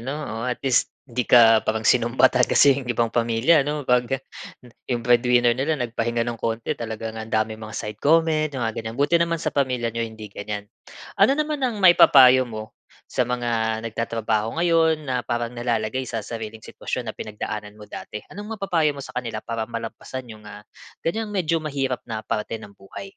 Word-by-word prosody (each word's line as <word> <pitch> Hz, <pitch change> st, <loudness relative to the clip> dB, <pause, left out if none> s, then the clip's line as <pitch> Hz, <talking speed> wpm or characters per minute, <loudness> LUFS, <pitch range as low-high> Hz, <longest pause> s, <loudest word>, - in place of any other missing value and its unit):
'no, 135 Hz, +5 st, -4 dB
oh, 115 Hz, -7 st, -5 dB
at 125 Hz, -, -1 dB
least 130 Hz, -2 st, +2 dB, 0.2 s
di 125 Hz, -2 st, -3 dB
ka 115 Hz, -2 st, +7 dB
parang 110 Hz, 0 st, -2 dB
sinumbatan 125 Hz, +1 st, +3 dB
kasi 140 Hz, -, +6 dB
yung 130 Hz, -, -10 dB
ibang 120 Hz, -1 st, 0 dB
pamilya 120 Hz, +7 st, +3 dB
'no 150 Hz, 0 st, -2 dB
pag 125 Hz, -1 st, +2 dB, 0.8 s
yung 120 Hz, -2 st, -1 dB
breadwinner 120 Hz, 0 st, +4 dB
nila 135 Hz, +6 st, 0 dB
nagpahinga 120 Hz, -2 st, -1 dB
ng 120 Hz, -1 st, -4 dB
konti 115 Hz, 0 st, -2 dB
talagang 110 Hz, -1 st, -6 dB
ang 110 Hz, -, -7 dB
daming 110 Hz, 0 st, -1 dB
mga 110 Hz, -1 st, -8 dB
side 105 Hz, 0 st, -5 dB
comment 155 Hz, 0 st, +3 dB
mga 120 Hz, -5 st, -3 dB
gan'yan. 110 Hz, +1 st, -6 dB
Buti 145 Hz, +5 st, +3 dB
naman 170 Hz, 0 st, +1 dB
sa 160 Hz, -, -3 dB
pamilya 125 Hz, -5 st, 0 dB
niyo 115 Hz, 0 st, -2 dB
hindi 110 Hz, -1 st, -11 dB
gan'yan. 105 Hz, 0 st, -5 dB, 0.6 s
Ano 210 Hz, +7 st, +6 dB
naman 305 Hz, -1 st, -1 dB
ang 250 Hz, -4 st, 0 dB
maipapayo 130 Hz, -7 st, +7 dB
mo 110 Hz, -1 st, -7 dB, 0.4 s
sa 125 Hz, -1 st, 0 dB
mga 115 Hz, -2 st, -1 dB
nagtatrabaho 115 Hz, 0 st, -2 dB
ngayon 165 Hz, -2 st, +2 dB
na 130 Hz, -3 st, -1 dB
parang 120 Hz, 0 st, -2 dB
nalalagay 120 Hz, +1 st, -2 dB
sa 115 Hz, -3 st, -4 dB
sariling 110 Hz, -1 st, -7 dB
sitwasyon 120 Hz, -3 st, -5 dB
na -, -, -11 dB
pinagdaanan 105 Hz, 0 st, -6 dB
mo 105 Hz, -, -11 dB
dati. 105 Hz, 0 st, -8 dB
Anong 210 Hz, +3 st, -7 dB
mapapayo 165 Hz, -7 st, 0 dB
mo 140 Hz, -, -7 dB
sa 125 Hz, -, -11 dB
kanila 115 Hz, -3 st, -4 dB
para 115 Hz, -1 st, -3 dB
malampasan 120 Hz, +2 st, -7 dB
yung, 105 Hz, 0 st, -14 dB
ah, 105 Hz, -, -10 dB, 0.4 s
gan'yang 220 Hz, +6 st, -1 dB
medyo 165 Hz, -3 st, +1 dB
mahirap 135 Hz, -4 st, -2 dB
na 110 Hz, -1 st, -4 dB
parte 110 Hz, +1 st, -3 dB
ng 105 Hz, -2 st, -12 dB
buhay? 100 Hz, -, -10 dB
120 Hz, 180 wpm, -23 LUFS, 110-140 Hz, 0.8 s, ka